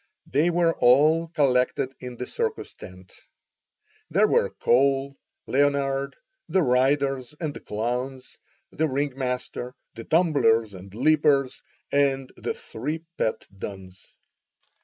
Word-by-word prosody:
They 150 +6 +2
were 170 -1 +2
all 155 +7 +5
collected 135 -4 +1
in 125 -1 -8
the 125 - -4
circus 450 - -3
tent. 95 0 -13 1.0
There - - +4
were - - +2
Cole, 135 +2 +1 0.3
Leonard, 140 0 +1 0.3
the 190 - +3
riders 135 +1 +1
and 155 -4 -3
the - - -8
clowns, 125 +4 -4 0.3
the 160 - 0
ringmaster, 130 -3 -3 0.2
the 115 - -9
tumblers 140 - +3
and 95 +1 -11
leapers, 140 +2 +2 0.3
and 135 -2 +1
the - - -4
three 150 +8 -5
pet 110 - -1
duns. 95 -1 -10
135 Hz, 115 wpm, -25 LUFS, 125-145 Hz, 1.0 s, all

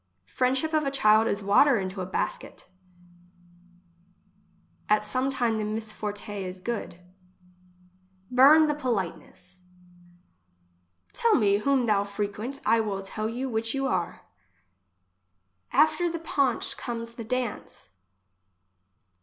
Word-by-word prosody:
Friendship 260 - 0
of 310 -1 +2
a 275 - 0
child 220 -4 +4
is 205 0 -1
water 235 +7 +5
into 190 0 -4
a 180 - -4
basket. 185 - -4 2.2
At 210 0 +3
some 255 +5 -1
thing 235 -4 0
the - - -1
misforte 215 -1 -5
is 185 0 -6
good. 220 -3 -5 1.3
Burn 285 +5 +7
the 295 - +1
politeness. 185 - -5 1.5
Tell 460 -2 +3
me 200 -3 +3
whom 265 +2 +1
thou 205 -3 +2
frequent, 205 +6 -4
I 225 +1 +4
will 200 -3 -2
tell 215 +3 -3
you 250 +4 -4
which 225 0 -2
you 270 0 -1
are. 180 -9 -2 1.5
After 310 +5 +3
the 335 - -4
paunch 280 -6 -1
comes 230 -1 -5
the 230 - -7
dance. 250 -1 -4
225 Hz, 115 wpm, -26 LUFS, 205-265 Hz, 2.2 s, Burn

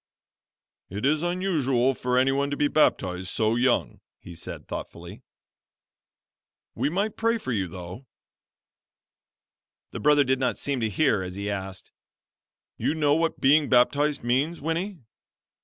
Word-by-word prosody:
"It 100 +6 -4
is 150 +2 +2
unusual 155 -8 +1
for 125 0 -1
anyone 135 +2 +2
to 145 - -3
be 145 - +2
baptized 95 -12 +1
so 110 +3 0
young," 120 +1 +1 0.2
he 90 - -12
said, 85 - -8
thoughtfully, - - -8 1.5
"We - - -1
might 200 +6 -1
pray 230 +1 +1
for 130 - -5
you 100 -6 -1
though." 90 +8 -9 1.8
The - - -6
brother 150 -1 +4
did 130 -1 0
not 125 -2 0
seem 140 -2 -2
to 110 -2 0
hear 110 -2 +2
as 90 0 -6
he 100 +1 -3
asked, 95 -1 -6 0.9
"You 155 - -1
know 150 -2 +2
what 165 +1 0
being 145 +2 +4
baptized 140 +4 +2
means, 135 +8 0
Winnie?" 170 +6 -3
135 Hz, 140 wpm, -26 LUFS, 110-155 Hz, 1.8 s, brother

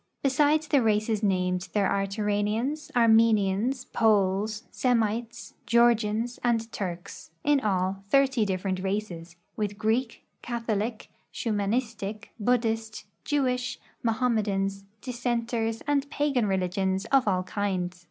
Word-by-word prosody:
Besides 295 +3 +3
the 280 -3 +3
races 215 -1 +1
named, 180 -2 0
there 205 -2 +2
are 195 0 0
Turanians, 210 +8 -1
Armenians, 225 +1 +3
Poles, 210 0 +1
Semites, 230 -2 -1
Georgians, 235 0 +2
and 230 -2 0
Turks 180 -3 -6
— - - -44
in 290 - +5
all, 190 -3 -1
thirty 270 -2 +3
different 190 -1 -1
races 185 -4 -4
— - - -46
with 205 -2 -2
Greek, 225 +3 -1 0.2
Catholic, 230 -1 -3 0.2
Shumanistic, 215 -1 -2
Buddhist, 225 -1 0 0.2
Jewish, 250 -4 0 0.2
Mohammedans, 210 -5 0 0.2
Dissenters 235 -2 -2
and 285 -1 0
pagan 280 -7 +1
religions 190 +1 0
of 270 -4 +4
all 185 -2 +2
kinds. 185 -2 -2
220 Hz, 115 wpm, -27 LUFS, 195-240 Hz, 0.2 s, in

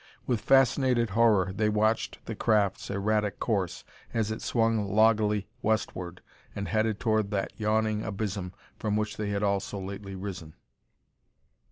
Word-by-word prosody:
With 120 -4 0
fascinated 130 -4 +3
horror, 105 -4 +3
they 105 +1 +1
watched 110 +1 0
the 115 - -4
craft's 105 -3 +1
erratic 105 +1 0
course, 100 -6 -1 0.3
as 110 -1 +1
it 110 - -4
swung 115 -3 +1
loggily 105 -1 +3 0.2
westward 95 -5 -2 0.3
and 100 0 -3
headed 110 -1 0
toward 110 -4 +1
that 100 -2 -2
yawning 110 0 +1
abysm 100 -3 -3 0.3
from 105 -1 -1
which 105 0 -2
they 105 -1 -2
had 100 0 -1
all 100 -1 +2
so 100 +1 -6
lately 100 +1 -6
risen. 90 -5 -7
105 Hz, 145 wpm, -28 LUFS, 100-110 Hz, 0.3 s, fascinated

